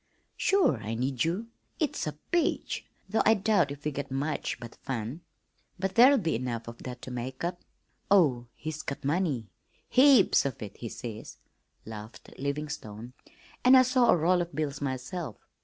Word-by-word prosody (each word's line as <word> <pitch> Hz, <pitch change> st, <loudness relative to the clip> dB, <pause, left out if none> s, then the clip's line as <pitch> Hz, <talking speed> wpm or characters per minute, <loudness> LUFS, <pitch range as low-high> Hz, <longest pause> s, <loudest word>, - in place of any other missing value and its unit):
"Sure 385 Hz, -, +3 dB
I 110 Hz, +1 st, -4 dB
need 125 Hz, +1 st, 0 dB
you! 180 Hz, +8 st, -1 dB, 0.3 s
It's 300 Hz, -, -1 dB
a 150 Hz, -, -2 dB, 0.2 s
peach, 345 Hz, -2 st, 0 dB, 0.2 s
though 215 Hz, +3 st, +1 dB
I 220 Hz, -, +5 dB
doubt 195 Hz, -6 st, +2 dB
if 145 Hz, +1 st, -8 dB
we 150 Hz, -, +1 dB
get 140 Hz, 0 st, -5 dB
much 140 Hz, +3 st, -2 dB
but 120 Hz, -1 st, -9 dB
fun, 130 Hz, +4 st, -4 dB, 0.6 s
but 190 Hz, +1 st, -2 dB
there'll 260 Hz, +6 st, +7 dB
be 165 Hz, -8 st, 0 dB
enough 115 Hz, -1 st, -3 dB
of 115 Hz, 0 st, -9 dB
that 125 Hz, -1 st, -7 dB
to 130 Hz, -, -7 dB
make 125 Hz, +3 st, -5 dB
up. 175 Hz, +1 st, -2 dB, 0.5 s
Oh, 140 Hz, -12 st, +4 dB
he's 155 Hz, 0 st, -5 dB
got 140 Hz, -, -6 dB
money 145 Hz, -, 0 dB, 0.4 s
'heaps 260 Hz, -5 st, +6 dB
of 140 Hz, -4 st, -3 dB
it,' 100 Hz, -2 st, -9 dB
he 115 Hz, -, -6 dB
says," 110 Hz, -2 st, -7 dB, 0.5 s
laughed 110 Hz, 0 st, -9 dB
Livingstone, 135 Hz, -5 st, -4 dB, 0.5 s
"and 255 Hz, +1 st, +8 dB
I 255 Hz, -, +8 dB
saw 255 Hz, -1 st, +3 dB
a -, -, +6 dB
roll 175 Hz, +3 st, +3 dB
of 170 Hz, -3 st, -5 dB
bills 150 Hz, -2 st, -2 dB
myself. 135 Hz, -, -4 dB
145 Hz, 170 wpm, -29 LUFS, 125-190 Hz, 0.6 s, and